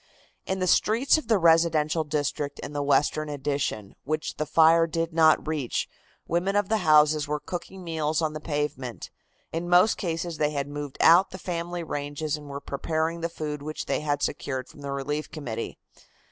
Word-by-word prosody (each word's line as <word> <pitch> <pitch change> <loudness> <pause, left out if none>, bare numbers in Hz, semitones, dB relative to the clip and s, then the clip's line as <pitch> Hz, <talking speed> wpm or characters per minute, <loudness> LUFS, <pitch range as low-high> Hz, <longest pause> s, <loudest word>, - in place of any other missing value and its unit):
In 190 - -1
the 185 - 0
streets 230 - +3
of 310 - -11
the 225 - +4
residential 165 -2 +3
district 145 -1 -2
in 150 - -7
the 145 - -1
western 145 +2 +1
addition, 140 -8 -3
which 155 +2 -3
the 155 - -2
fire 165 +2 +5
did 165 0 -2
not 160 -1 +4
reach, 150 -6 -1 0.4
women 180 +4 0
of 205 -2 +1
the 220 - +3
houses 155 -4 +4
were 150 0 -1
cooking 185 +3 -7
meals 160 -2 -1
on 155 -2 0
the 155 - -5
pavement. 145 -5 -4 0.4
In 170 +2 -3
most 180 +5 +5
cases 165 -2 -3
they 150 - +2
had 140 -2 -3
moved 145 -1 -6
out 175 +4 +6
the 185 - -8
family 175 -1 -4
ranges, 145 0 -3
and 150 -1 -10
were 140 0 -5
preparing 160 +4 -2
the 170 - -1
food 150 -3 -5
which 155 +1 -5
they - - 0
had 145 -1 -1
secured 130 -3 -3
from 145 - -15
the 140 -1 -5
Relief 145 +2 -3
Committee. 125 -8 -5
155 Hz, 185 wpm, -26 LUFS, 145-170 Hz, 0.4 s, out